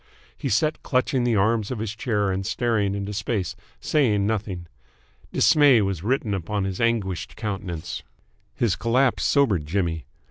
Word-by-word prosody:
He - - -4
sat 150 +10 +1
clutching 130 -1 +1
the 120 -2 +2
arms 110 +1 +2
of 130 - -3
his 110 0 -4
chair 105 -5 0
and 95 +1 -2
staring 105 -2 0
into 100 +1 -4
space, 100 -4 -2 0.2
saying 110 -10 +2
nothing. 100 -5 -2 0.7
Dismay 145 - +5
was 95 -4 -2
written 115 0 0
upon 100 +2 -2
his 95 +2 -3
anguished 100 -6 -1
countenance. 95 -7 -4 0.5
His 115 -6 +1
collapse 125 +2 +2
sobered 105 - +2
Jimmy. 85 -2 -1
105 Hz, 145 wpm, -24 LUFS, 95-120 Hz, 0.7 s, Dismay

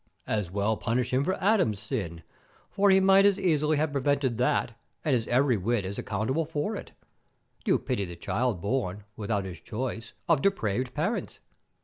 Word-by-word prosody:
As 105 -5 -1
well 100 +3 0
punish 120 +2 -1
him 130 +2 +3
for 185 +5 0
Adam's 185 - +2
sin, 100 - -4 0.5
for 200 0 +3
he 190 0 +6
might 195 +1 +6
as 200 -1 +4
easily 155 -3 +2
have 155 0 +1
prevented 140 -3 0
that, 125 -1 +1 0.3
and 145 -4 +3
is 115 -2 -1
every 125 -1 +3
whit 105 +1 0
as 100 +2 -5
accountable 110 +10 -1
for 160 +7 -2
it. - - -8 0.8
You - - +4
pity 100 - -2
the 85 -1 -8
child 110 +2 -1
born, 105 -3 -2
without 100 -2 -2
his 90 -4 -7
choice, 115 -1 -5
of 165 -5 +3
depraved 125 - 0
parents. 175 +10 -2
125 Hz, 170 wpm, -28 LUFS, 105-155 Hz, 0.8 s, he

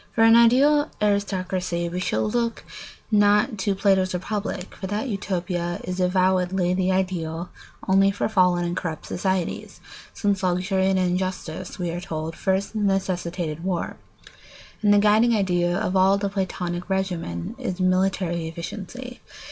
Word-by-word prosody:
] - - -35
For 225 - +4
an 225 0 +7
ideal 275 +6 +5
aristocracy 185 -4 -1
we 175 +1 -3
should 210 +3 -1 0.8
not 205 +2 +4
look 215 - -7
to 195 0 0
Plato's 190 -2 +2
Republic, 200 0 -4
for 190 - -6
that 210 +6 -2
Utopia 180 -4 -2
is 180 +1 -4
avowedly 185 0 +2
the 185 0 +1
ideal 175 -3 -2 0.4
only 195 +1 +5
for 200 - -1
fallen 180 -4 +3
and 175 0 -2
corrupt 160 -3 -4
states, 185 -1 -2 0.3
since 200 -2 -1
luxury 190 +1 +1
and 190 - +2
injustice, 185 -1 -2
we 175 -3 -2
are 175 +1 -4
told, 160 -1 -5
first 190 +4 -1
necessitated 180 -5 -1
war, 180 -2 -2 0.8
and 210 -1 +4
the 205 - +6
guiding 215 +3 +4
idea 175 -3 +1
of 195 -2 -1
all 190 +1 +5
the 200 0 -1
Platonic 180 -2 -3
regimen 180 - -2
is 195 -8 -4
military 185 -2 +1
efficiency. 205 +9 -7
185 Hz, 145 wpm, -24 LUFS, 175-200 Hz, 0.8 s, an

